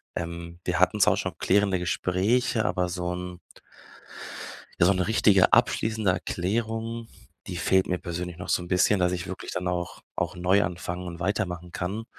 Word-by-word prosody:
ähm, 85 0 -5
wir 90 -3 0
hatten 95 +3 +3
zwar - - +6
auch - - -2
schon 90 -3 -3
klärende 100 -1 +2
Gespräche, 105 +7 +1
aber 90 0 0
so 90 0 -2
'n 90 0 -6 1.4
ja, 85 - +5
so 100 - +6
'ne 90 -1 0
richtige 100 -4 +5
abschließende 110 -3 +3
Erklärung, 115 +6 -2 0.4
die 90 - -4
fehlt 95 +2 +3
mir 90 -1 0
persönlich 85 -1 -5
noch 90 - -7
so 90 - +2
'n 85 - -9
bisschen, 95 +2 +3
dass 90 0 +2
ich 90 0 -3
wirklich 95 - -6
dann 90 0 -2
auch 90 -1 -3 0.2
auch - - -1
neu 90 +3 +3
anfangen 90 0 -4
und 85 0 -7
weitermachen 90 -2 -2
kann, 100 +6 -3
90 Hz, 175 wpm, -26 LUFS, 90-100 Hz, 1.4 s, zwar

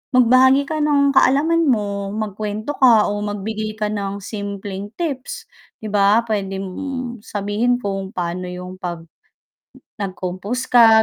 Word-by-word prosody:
magbahagi 255 +3 +6
ka 310 +2 -3
ng 285 -2 +3
kaalaman 305 +4 +3
mo, 200 -4 0
magkwento 215 +3 -3
ka 230 -6 +6
o 205 - -2
magbigay 215 +1 -4
ka 210 -1 -2
ng 200 -1 -4
simpleng 200 -1 -5
tips 280 -6 -4 0.4
'di 215 - -4
ba, 205 +3 +4
pwede 200 -3 -2
mong 250 +4 -5
sabihin 205 +4 0
kung 195 -4 -4
paano 180 +1 -3
yung 180 +1 -8
'pag 170 -2 -4 1.0
nag-compose 190 +5 -4
ka 225 -2 +7
210 Hz, 130 wpm, -20 LUFS, 195-250 Hz, 1.0 s, ka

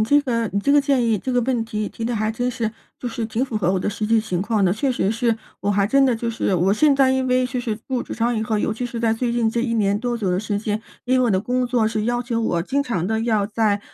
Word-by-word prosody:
你 - - +3
这 285 +6 +4
个 230 -5 -1
你 200 - +1
这 280 +8 +2
个 290 - +6
建 275 -3 +1
议 225 -2 +2
这 255 +6 -3
个 245 - +3
问 240 -2 0
题 215 -2 -3
提 225 - -7
得 240 +1 -1
还 215 0 0
真 245 +3 -1
是， 230 -3 -2 0.3
就 245 - -4
是 230 -1 -4
挺 225 +3 -1
符 240 -5 -4
合 185 -3 +1
我 190 - +1
的 - - -2
实 210 +1 -3
际 225 0 +3
情 185 -5 -2
况 210 -1 +1
的。 180 - +3
确 260 +7 0
实 215 -4 0
是 230 0 +1 0.2
我 200 - 0
还 200 -1 +2
真 275 +5 +4
的 255 -3 +3
就 230 +1 -3
是 225 -3 -1
我 185 +3 +2
现 285 +7 +4
在 270 -1 +4
因 265 0 0
为 255 0 +2
就 250 0 -3
是 225 -3 -3
进 215 - -20
入 255 -2 -1
职 - - -7
场 235 +1 0
以 220 - 0
后， 220 -1 -1
尤 220 - -1
其 245 +3 -4
是 240 -1 -5
在 225 -1 +2
最 240 +1 -1
近 235 -2 +1
这 235 +1 -1
一 230 -2 -1
年 200 -2 +2
多 240 0 -1
左 200 -5 -1
右 180 - +1
时 210 -1 -2
间， 215 +1 -2 0.2
因 255 +1 +2
为 255 - +3
我 240 - +2
的 190 -1 +2
工 250 +3 0
作 235 -3 +2
是 215 -1 -1
要 240 +1 0
求 235 -1 -2
我 170 -6 0
经 280 +8 0
常 190 - -2
地 220 +1 0
要 220 -3 +1
在 210 -1 +1
230 Hz, 345 characters per minute, -22 LUFS, 215-245 Hz, 0.3 s, 个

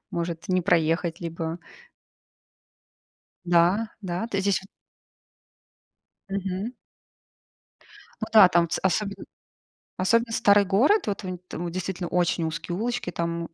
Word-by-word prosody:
может 170 0 -4
не 185 0 +2
проехать, 165 -1 +1
либо. 165 -1 -4 1.9
Да, 175 +6 +3
да. 185 +2 -3
То 205 -4 -3
есть 195 - -1
здесь 200 -1 +2
вот 195 - -15 1.6
Мгм. 195 +4 -3 1.5
Ну - - -2
да, 215 -4 +9
там 170 -1 +2
ц - - -1
особенно 200 +2 -1 0.7
особенно 230 +5 +2
старый 205 -2 +5
город. 240 - +3
Вот 205 0 -2
внь 185 -1 -5
там 175 0 -5
действительно 180 0 -4
очень 175 -1 +1
узкие 165 +2 -4
улочки, 240 +4 -2
там 170 0 -3
185 Hz, 120 wpm, -25 LUFS, 170-200 Hz, 1.9 s, да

